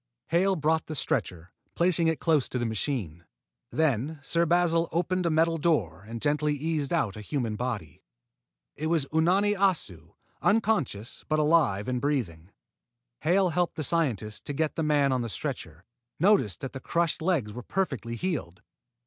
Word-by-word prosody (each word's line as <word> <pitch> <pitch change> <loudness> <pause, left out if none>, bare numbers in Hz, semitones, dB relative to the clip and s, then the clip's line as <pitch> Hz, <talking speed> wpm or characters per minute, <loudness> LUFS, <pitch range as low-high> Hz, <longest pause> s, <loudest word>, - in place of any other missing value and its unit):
Hale 190 +4 +3
brought 160 0 +1
the 155 - -4
stretcher, 90 - -2 0.2
placing 170 -1 +3
it 160 -1 +1
close 155 -5 +2
to - - -2
the 120 - -1
machine. 110 - -3 0.5
Then 150 0 0
Sir 170 +4 +1
Basil 170 0 +2
opened 180 +1 0
a - - +3
metal 165 +1 +2
door 105 - 0
and 115 +1 -6
gently 150 0 +1
eased 150 -1 -2
out 100 - 0
a 110 - -7
human 115 -1 -2
body. 105 - -4 0.7
It 155 - -3
was 160 -4 +1
Unani 185 +6 +3
Assu, 170 - -1 0.3
unconscious 200 - 0
but 155 - +2
alive 150 -10 +3
and 125 -1 -1
breathing. 100 - -2 0.7
Hale, 185 +3 +3
helping 175 +1 0
the 155 - -3
scientist 125 - -1
to 145 - -3
get 155 +2 0
the - - -2
man 145 -3 +3
on 130 -1 +1
the 115 - -3
stretcher, 90 - -5 0.4
noticed 180 - +3
that 135 - -5
the 135 - -5
crushed 170 +3 0
legs 155 - 0
were 125 - -6
perfectly 130 - -2
healed. 120 - -4
150 Hz, 165 wpm, -28 LUFS, 115-170 Hz, 0.7 s, Hale